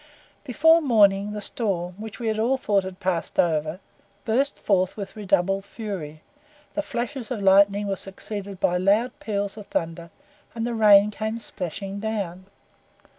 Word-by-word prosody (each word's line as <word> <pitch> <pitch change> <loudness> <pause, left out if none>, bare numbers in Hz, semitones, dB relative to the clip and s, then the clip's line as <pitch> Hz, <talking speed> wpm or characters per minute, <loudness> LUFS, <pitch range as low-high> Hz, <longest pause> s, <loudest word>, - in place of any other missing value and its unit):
Before 320 +5 +4
morning 210 -6 +3
the 210 - -5
storm, 185 -5 -2
which 220 -1 -7
we 225 -2 0
all 250 +4 +2
thought 205 -6 +1
had 185 -1 -8
passed 180 -3 -2
over, 155 0 +1 0.5
burst 260 +6 +1
forth 185 -1 +1
with 200 0 -6
redoubled 195 -1 +1
fury; 190 -9 -7 0.5
the 305 - -1
flashes 245 -2 -4
of 250 -4 -3
lightning 200 +1 +4
were 200 -1 -1
succeeded 195 0 -7
by 180 -1 +2
loud 205 +7 +2
peals 200 -1 -3
of 210 - -9
thunder, 165 0 -3 0.5
and 230 0 -2
the 240 - -2
rain 210 -2 +6
came 220 +2 -3
splashing 195 -2 -5
down. 195 -4 -4
200 Hz, 150 wpm, -24 LUFS, 190-220 Hz, 0.5 s, rain